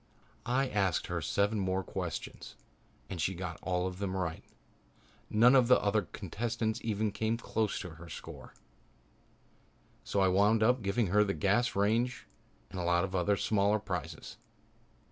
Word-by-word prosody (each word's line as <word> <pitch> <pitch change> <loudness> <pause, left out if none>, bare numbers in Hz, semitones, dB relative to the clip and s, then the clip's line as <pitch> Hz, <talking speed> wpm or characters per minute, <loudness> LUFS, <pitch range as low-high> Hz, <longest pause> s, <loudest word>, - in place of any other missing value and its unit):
I 130 +3 +2
asked 100 -7 0
her 85 -1 -3
seven 100 +5 +1
more 95 0 0
questions - - -6 0.5
and 90 -4 -5
she 95 +4 0
got 85 -2 -5
them 95 +1 -2
all 95 - 0
right. 80 -2 -5 0.9
None 120 +4 +6
of 130 -3 +5
the 125 - +6
other 105 +1 +2
contestants 110 +3 -2
even 110 -1 0
came 110 +2 -1
close 110 -2 -1
to 90 - -6
her 85 +2 -12
score, - - -10 1.5
so 100 - -1
I 95 - +4
wound 105 +4 +4
up 125 +2 +3
giving 100 +3 +1
her 105 0 +6
the 100 -1 -1
gas 105 +5 +1
range 115 +5 +1 0.5
and 95 - -5
a - - -2
lot 85 +1 +2
of 95 -1 -4
other 95 +2 +2
smaller 105 0 +2
prizes. 90 -6 -6
100 Hz, 155 wpm, -31 LUFS, 95-110 Hz, 1.5 s, None